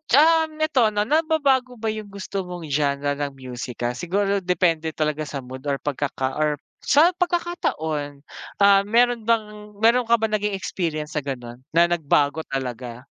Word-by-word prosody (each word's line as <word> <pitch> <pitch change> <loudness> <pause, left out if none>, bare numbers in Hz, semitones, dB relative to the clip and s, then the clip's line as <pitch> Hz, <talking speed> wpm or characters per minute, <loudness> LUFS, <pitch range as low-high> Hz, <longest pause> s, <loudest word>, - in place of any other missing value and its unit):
um, 320 +3 +4
neto 310 -6 +2
'no, 205 - +2
nababago 280 -2 +2
ba 225 -2 -2
yung 215 -1 -5
gusto 195 -1 -5
mong 180 -1 -7
genre 145 0 0
ng 145 -1 -3
musika? 125 -2 -5
Siguro 195 +9 0
depende 165 -4 0
talaga 155 0 -1
sa 140 -1 -5
mood 130 +2 -10
or 140 -2 -1
pagkaka 140 -2 -2
or 150 -2 0 0.2
sa 315 +5 +4
pagkakataon? 160 - -2 0.4
Ah, 200 0 +6
meron 235 +1 +2
bang 210 -2 -1
meron 235 +2 +4
ka 235 - +4
bang 220 -2 +1
naging 210 0 -2
experience 160 -5 -3
sa - - -3
gano'n 125 -3 -6 0.2
na 170 +1 +5
nagbago 155 -2 +1
talaga? 125 -2 -5
175 Hz, 155 wpm, -23 LUFS, 145-225 Hz, 0.4 s, Ah